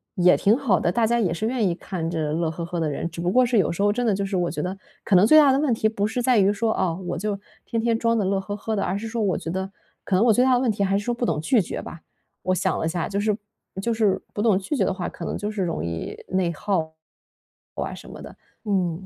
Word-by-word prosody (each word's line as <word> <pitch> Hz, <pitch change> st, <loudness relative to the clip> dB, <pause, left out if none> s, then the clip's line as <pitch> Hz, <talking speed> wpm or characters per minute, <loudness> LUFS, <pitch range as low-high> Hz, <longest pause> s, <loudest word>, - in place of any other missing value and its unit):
也 180 Hz, -2 st, +5 dB
挺 210 Hz, +4 st, +3 dB
好 230 Hz, -, +2 dB
的， 170 Hz, -, +1 dB
大 230 Hz, +2 st, +2 dB
家 235 Hz, +1 st, +2 dB
也 185 Hz, -7 st, +1 dB
是 190 Hz, +6 st, -3 dB
愿 240 Hz, -2 st, 0 dB
意 175 Hz, -, +1 dB
看 170 Hz, -3 st, -4 dB
着 155 Hz, -3 st, -2 dB
乐 165 Hz, 0 st, 0 dB
呵 165 Hz, +1 st, -5 dB
呵 170 Hz, 0 st, -4 dB
的 160 Hz, -2 st, 0 dB
人。 150 Hz, +3 st, -3 dB
只 170 Hz, 0 st, -7 dB
不 175 Hz, +1 st, 0 dB
过 255 Hz, +4 st, +5 dB
是 240 Hz, -1 st, +1 dB
有 190 Hz, -, +2 dB
时 170 Hz, -, -3 dB
候 205 Hz, 0 st, +3 dB
真 245 Hz, +2 st, -1 dB
的 220 Hz, -, +3 dB
就 200 Hz, 0 st, -1 dB
是 195 Hz, 0 st, -3 dB
我 175 Hz, -1 st, 0 dB
觉 -, -, -3 dB
得 185 Hz, +2 st, -3 dB, 0.3 s
可 195 Hz, -, +3 dB
能 185 Hz, +3 st, +7 dB
最 310 Hz, -, +7 dB
大 285 Hz, -3 st, +6 dB
的 270 Hz, -, +2 dB
问 285 Hz, -4 st, +2 dB
题 220 Hz, -1 st, +1 dB
不 205 Hz, -2 st, -1 dB
是 225 Hz, +3 st, -2 dB
在 250 Hz, -1 st, +3 dB
于 195 Hz, 0 st, +4 dB
说， 220 Hz, +2 st, 0 dB
啊， 185 Hz, -3 st, 0 dB
我 180 Hz, 0 st, -5 dB
就 200 Hz, +2 st, -2 dB, 0.3 s
天 230 Hz, -, -2 dB
天 230 Hz, 0 st, +1 dB
装 230 Hz, 0 st, +1 dB
得 205 Hz, -, +1 dB
乐 195 Hz, +1 st, +1 dB
呵 205 Hz, +1 st, -6 dB
呵 220 Hz, +1 st, -3 dB
的。 200 Hz, -, 0 dB
而 190 Hz, -, -1 dB
是 225 Hz, +3 st, -5 dB
说 230 Hz, +1 st, -3 dB
我 190 Hz, -6 st, +1 dB
觉 -, -, -6 dB
得 190 Hz, +2 st, -3 dB, 0.3 s
可 -, -, -4 dB
能 200 Hz, +5 st, +4 dB
我 230 Hz, -, +5 dB
最 245 Hz, -, +4 dB
大 260 Hz, -1 st, +4 dB
的 -, -, +2 dB
问 250 Hz, -1 st, +1 dB
题 205 Hz, -1 st, -1 dB
还 195 Hz, 0 st, +2 dB
是 205 Hz, -, -4 dB
说 240 Hz, -, 0 dB
不 240 Hz, -, -1 dB
懂 155 Hz, -9 st, 0 dB
拒 220 Hz, +8 st, +3 dB
绝 175 Hz, -, -5 dB
吧。 170 Hz, -, -10 dB, 0.4 s
我 185 Hz, -, +1 dB
想 -, -, 0 dB
了 -, -, -1 dB
一 -, -, 0 dB
下， 175 Hz, 0 st, -2 dB
就 200 Hz, -, -1 dB
是 210 Hz, 0 st, +1 dB, 0.4 s
就 235 Hz, +3 st, 0 dB
是 215 Hz, -4 st, +1 dB
不 205 Hz, -, -2 dB
懂 215 Hz, -4 st, +4 dB
拒 200 Hz, +9 st, -3 dB
绝 -, -, +2 dB
的 -, -, 0 dB
话， 185 Hz, -2 st, -4 dB
可 -, -, -10 dB
能 -, -, -3 dB
就 205 Hz, -, -3 dB
是 205 Hz, -3 st, -2 dB
容 165 Hz, -, -2 dB
易 85 Hz, -1 st, -5 dB
内 185 Hz, -2 st, +1 dB
耗 160 Hz, -2 st, -2 dB, 0.8 s
哇 -, -, -3 dB
什 -, -, -11 dB
么 -, -, -10 dB
的， -, -, -10 dB, 0.3 s
嗯。 185 Hz, -3 st, -1 dB
200 Hz, 330 characters per minute, -24 LUFS, 175-225 Hz, 0.8 s, 能